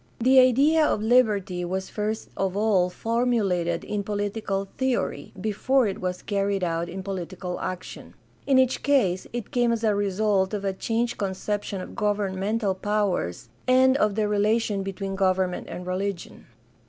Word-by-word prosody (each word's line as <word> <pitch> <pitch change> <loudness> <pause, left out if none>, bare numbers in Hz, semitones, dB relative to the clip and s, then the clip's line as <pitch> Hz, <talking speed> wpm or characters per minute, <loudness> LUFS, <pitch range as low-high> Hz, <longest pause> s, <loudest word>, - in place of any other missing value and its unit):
The 260 +3 +6
idea 275 +6 +5
of 215 -7 +1
liberty 210 -6 +2
was 190 +2 -3
first 215 +1 -3
of 195 0 -1
all 200 -4 +3
formulated 205 -7 0
in 210 -1 -2
political 205 -1 -2
theory 260 -2 -1
before 230 +6 +1
it 195 -3 -3
was 180 0 -3
carried 200 -2 -1
out 170 0 -1
in 190 +2 -6
political 185 -1 -5
action. 185 0 -6 0.3
In 270 -2 +4
each 260 -1 +3
case 210 -11 +2
it 240 -3 -5
came 240 -1 +2
as 230 -1 -1
a 215 -2 +3
result 200 0 +1
of 200 -1 -4
a 195 - 0
changed 235 +5 -2
conception 200 0 -3
of - - -8
governmental 205 0 0
powers 190 - -1 0.2
and 260 +1 +5
of 210 -6 +1
the 215 -1 +1
relation 210 0 +1
between 195 0 -4
government 185 -1 0
and 180 - -6
religion. 185 0 -4
205 Hz, 155 wpm, -25 LUFS, 190-225 Hz, 0.3 s, The